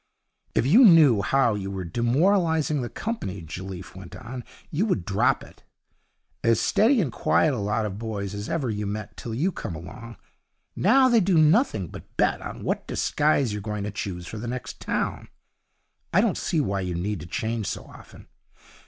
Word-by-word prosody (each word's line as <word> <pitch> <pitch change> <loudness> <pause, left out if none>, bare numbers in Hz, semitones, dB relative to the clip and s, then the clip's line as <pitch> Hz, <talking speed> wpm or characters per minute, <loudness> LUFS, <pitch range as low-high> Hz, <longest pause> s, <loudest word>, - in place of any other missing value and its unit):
'If - - +2
you 205 - +7
knew 155 - +7
how 120 +3 +2
you 100 -2 -4
were 95 -1 -4
demoralizing 155 - +1
the 120 - -4
company,' 100 - -4
Jelliffe 90 +2 -8
went 95 -2 -10
on, 125 +1 -7 0.3
'you 180 +9 0
would 100 - 0
drop 100 -1 +1
it. - - -16 0.8
As 115 -1 +3
steady 235 +4 +3
and 155 - 0
quiet 150 +6 +2
a 125 - -2
lot 105 +2 0
of 100 -1 -5
boys 105 -3 -4
as 105 +1 -5
ever 135 -8 -1
you 105 -1 -3
met 105 +1 -5
till 115 -2 -6
you 165 +10 +1
came 85 - -6
along. 110 +8 -9 0.6
Now 265 0 +5
they 240 -2 +5
do 185 -3 +2
nothing 155 - +3
but - - -12
bet - - +2
on - - -7
what - - -2
disguise 145 -6 +1
you're 105 - -4
going 105 0 -4
to 105 - -3
choose 95 -4 -5
for 110 - -7
the 120 - -5
next 125 +1 -5
town. - - -2 0.8
I - - +4
don't - - +2
see 165 - -1
why 100 -9 0
you 90 -2 -3
need 100 +3 -2
to 80 - -9
change 110 +3 -2
so - - -4
often. - - -15
110 Hz, 190 wpm, -25 LUFS, 100-155 Hz, 0.8 s, you